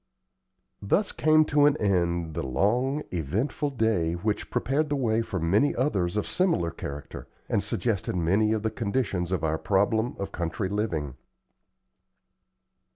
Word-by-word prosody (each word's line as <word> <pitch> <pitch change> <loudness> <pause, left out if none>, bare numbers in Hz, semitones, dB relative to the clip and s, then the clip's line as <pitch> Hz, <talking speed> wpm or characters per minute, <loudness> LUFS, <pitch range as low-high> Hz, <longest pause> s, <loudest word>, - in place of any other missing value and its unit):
Thus 190 - +1
came 155 0 +4
to 145 -1 +4
an 150 0 +2
end 85 -5 0
the - - -3
long, 120 - 0
eventful 100 - -1
day, 110 -10 +1
which 105 +5 -2
prepared 145 +3 0
the 145 - 0
way 115 -4 +1
for 100 -5 -3
many 100 - +2
others 100 -9 0
of 105 - 0
similar 170 - +1
character, 70 -3 -7 0.2
and - - +1
suggested - - -2
many 95 +6 +2
of 110 -1 0
the 110 - 0
conditions 100 -5 -2
of 95 - -1
our 80 0 0
problem 110 +4 +1
of 100 - -4
country 90 +3 -3
living. 85 - -2
105 Hz, 145 wpm, -27 LUFS, 85-125 Hz, 0.2 s, came